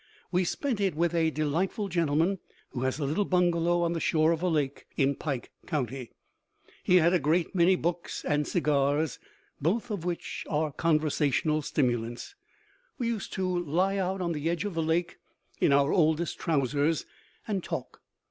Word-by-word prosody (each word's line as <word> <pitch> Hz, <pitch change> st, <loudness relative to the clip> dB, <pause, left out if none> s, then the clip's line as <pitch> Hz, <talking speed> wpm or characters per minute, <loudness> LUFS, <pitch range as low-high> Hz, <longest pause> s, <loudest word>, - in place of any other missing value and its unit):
We 180 Hz, 0 st, +2 dB
spent 240 Hz, -, -1 dB
it 190 Hz, -5 st, +1 dB
with 170 Hz, +1 st, +1 dB
a 165 Hz, -1 st, +3 dB
delightful 165 Hz, +8 st, -1 dB
gentleman 170 Hz, +1 st, +1 dB, 0.3 s
who 125 Hz, -, -4 dB
has 130 Hz, 0 st, 0 dB
a 150 Hz, -, -2 dB
little 155 Hz, +9 st, +1 dB
bungalow 175 Hz, -2 st, +2 dB
on 170 Hz, 0 st, +1 dB
the 165 Hz, -, -2 dB
shore 160 Hz, 0 st, +3 dB
of 165 Hz, -1 st, -1 dB
a 180 Hz, -, +1 dB
lake 150 Hz, -5 st, -1 dB
in 140 Hz, 0 st, +3 dB
Pike 135 Hz, -4 st, -4 dB, 0.2 s
County. 135 Hz, -5 st, -3 dB, 0.7 s
He 180 Hz, -, +4 dB
had 170 Hz, 0 st, +5 dB
a 180 Hz, -, +4 dB
great 160 Hz, +6 st, +1 dB
many 185 Hz, 0 st, +4 dB
books 175 Hz, 0 st, -3 dB
and 150 Hz, 0 st, +1 dB
cigars, 145 Hz, -3 st, +1 dB, 0.4 s
both 215 Hz, -, 0 dB
of 200 Hz, -6 st, -3 dB
which 175 Hz, -1 st, -4 dB
are 155 Hz, 0 st, 0 dB
conversational 155 Hz, -1 st, +1 dB
stimulants. 120 Hz, -, -1 dB, 0.6 s
We 240 Hz, -3 st, -1 dB
used 220 Hz, -4 st, -3 dB
to 190 Hz, -1 st, -1 dB, 0.2 s
lie 185 Hz, +6 st, +1 dB
out 190 Hz, 0 st, -1 dB
on 170 Hz, -1 st, -1 dB
the 155 Hz, 0 st, -1 dB
edge 175 Hz, +4 st, -1 dB
of 205 Hz, -, -3 dB
the 165 Hz, -, -1 dB
lake, 165 Hz, +2 st, 0 dB, 0.4 s
in -, -, +3 dB
our 140 Hz, +1 st, +4 dB
oldest 160 Hz, -1 st, +2 dB
trousers, 145 Hz, 0 st, +1 dB, 0.4 s
and 200 Hz, -4 st, -1 dB
talk. -, -, -5 dB
165 Hz, 170 wpm, -28 LUFS, 150-180 Hz, 0.7 s, had